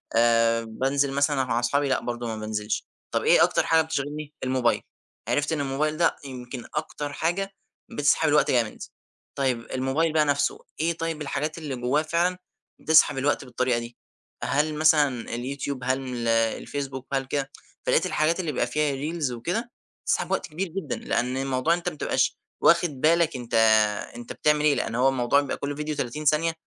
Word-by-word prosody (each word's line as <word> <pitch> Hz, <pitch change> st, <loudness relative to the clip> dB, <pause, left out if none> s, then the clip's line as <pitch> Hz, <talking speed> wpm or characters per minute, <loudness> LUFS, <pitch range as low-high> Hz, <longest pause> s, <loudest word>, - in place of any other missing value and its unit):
آآ 115 Hz, 0 st, +4 dB
بانزل 135 Hz, +5 st, 0 dB
مثلًا 140 Hz, -1 st, +2 dB
مع 120 Hz, -1 st, 0 dB
أصحابي؟ 140 Hz, +4 st, +1 dB
لأ 130 Hz, -, +2 dB
برضو 120 Hz, -1 st, -4 dB
ما 110 Hz, -, -3 dB
بانزلش. 110 Hz, 0 st, -3 dB, 0.3 s
طب -, -, +1 dB
إيه -, -, +6 dB
أكتر -, -, +2 dB
حاجة 160 Hz, 0 st, +4 dB
بتشغِلْني؟ 150 Hz, -1 st, -4 dB
الموبايل. 130 Hz, -2 st, +1 dB, 0.5 s
عرِفت 145 Hz, +5 st, +1 dB
إن 155 Hz, -, 0 dB
الموبايل 145 Hz, +3 st, -1 dB
ده 170 Hz, 0 st, +3 dB
يمكن 125 Hz, -2 st, -7 dB
أكتر 150 Hz, -1 st, -3 dB
حاجة 190 Hz, +6 st, -1 dB, 0.5 s
بتسحَب 145 Hz, +2 st, +3 dB
الوقت 150 Hz, 0 st, +3 dB
جامد. 115 Hz, -4 st, 0 dB, 0.6 s
طيب 130 Hz, -4 st, -1 dB
الموبايل 135 Hz, +5 st, 0 dB
بقى 155 Hz, -1 st, +4 dB
نفسه، 145 Hz, -1 st, +1 dB, 0.2 s
إيه 165 Hz, +2 st, +1 dB
طيب 165 Hz, -2 st, -3 dB
الحاجات 150 Hz, +2 st, -3 dB
اللي 150 Hz, -5 st, -4 dB
جوّاه 125 Hz, +5 st, +1 dB
فعلًا 170 Hz, +3 st, 0 dB, 0.4 s
بتسحَب 155 Hz, -3 st, +5 dB
الوقت 140 Hz, 0 st, 0 dB
بالطريقة 125 Hz, -1 st, 0 dB
دي؟ 120 Hz, 0 st, -9 dB, 0.5 s
هل 155 Hz, +2 st, +1 dB
مثلًا 150 Hz, -5 st, +3 dB
اليوتيوب؟ 130 Hz, +1 st, -4 dB
هل 130 Hz, +1 st, 0 dB
من 130 Hz, -1 st, -6 dB
ال 120 Hz, -1 st, -3 dB
الفيسبوك؟ 130 Hz, +4 st, -1 dB
هل 135 Hz, -1 st, 0 dB
كده، 135 Hz, +1 st, -2 dB, 0.3 s
فلقيت -, -, +3 dB
الحاجات 165 Hz, +4 st, +1 dB
اللي 165 Hz, -4 st, -1 dB
بيبقى 120 Hz, -, 0 dB
فيها 150 Hz, +3 st, 0 dB
ريلز 150 Hz, 0 st, -2 dB
وكده 180 Hz, -, -3 dB, 0.3 s
بتسحَب -, -, 0 dB
وقت -, -, 0 dB
كبير 175 Hz, +5 st, -3 dB
جدًا، 165 Hz, -6 st, -4 dB
لأن 125 Hz, +2 st, -1 dB
الموضوع 135 Hz, +3 st, +1 dB
إن 175 Hz, -, +1 dB
أنت 175 Hz, 0 st, -2 dB
ما 155 Hz, -, -10 dB
تبقاش -, -, 0 dB, 0.3 s
واخد 170 Hz, 0 st, +5 dB
بالك 165 Hz, -1 st, +3 dB
أنت 120 Hz, -2 st, -7 dB, 0.6 s
أنت 120 Hz, 0 st, -7 dB
بتعمل 150 Hz, 0 st, +2 dB
إيه، 145 Hz, -, +4 dB
لأن 115 Hz, -, -2 dB
هو 130 Hz, +2 st, +4 dB
الموضوع 130 Hz, +2 st, +2 dB
بيبقى 140 Hz, -, -4 dB
كل 145 Hz, 0 st, -4 dB
فيديو 150 Hz, 0 st, -3 dB
30 140 Hz, +5 st, -4 dB
ثانية، 155 Hz, +3 st, +3 dB
140 Hz, 180 wpm, -25 LUFS, 125-155 Hz, 0.6 s, إيه